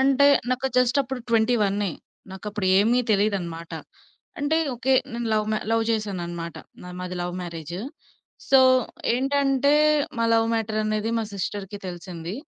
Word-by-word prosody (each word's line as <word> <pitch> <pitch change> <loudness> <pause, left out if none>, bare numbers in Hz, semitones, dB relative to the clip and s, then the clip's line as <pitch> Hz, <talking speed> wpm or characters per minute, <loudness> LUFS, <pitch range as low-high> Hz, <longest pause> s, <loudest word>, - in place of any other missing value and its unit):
అంటే 275 +1 +4 0.2
నాకు 255 +1 0
జస్ట్ 250 +1 +3
అప్పుడు 265 -1 -5
ట్వెంటీ 230 +1 +3
వన్నే 200 -1 0 0.4
నాకప్పుడు 205 +1 -4
ఏమీ 230 +5 +3
తెలీదన్నమాట. 190 -5 -1 0.7
అంటే 290 +2 +1 0.2
ఓకే. 255 +2 0 0.2
నేను 235 0 -3
లవ్ 215 -1 +2
మ - - +2 0.2
లవ్ 225 0 +2
చేశానన్నమాట. 175 -6 -3 0.3
నా 180 - -9
మాది 180 0 -5
లవ్ 175 0 -4
మ్యారేజ్. 170 -1 -6 0.7
సో 270 - +7 0.5
ఏంటంటే, 275 +1 +2 0.4
మా 230 - +2
లవ్ 225 0 +3
మ్యాటర్ 220 -1 -1
అనేది 215 +1 -1
మా 225 - -1
సిస్టర్‌కి 200 +1 -4
తెలిసింది. 175 0 -7
215 Hz, 140 wpm, -24 LUFS, 185-250 Hz, 0.7 s, సో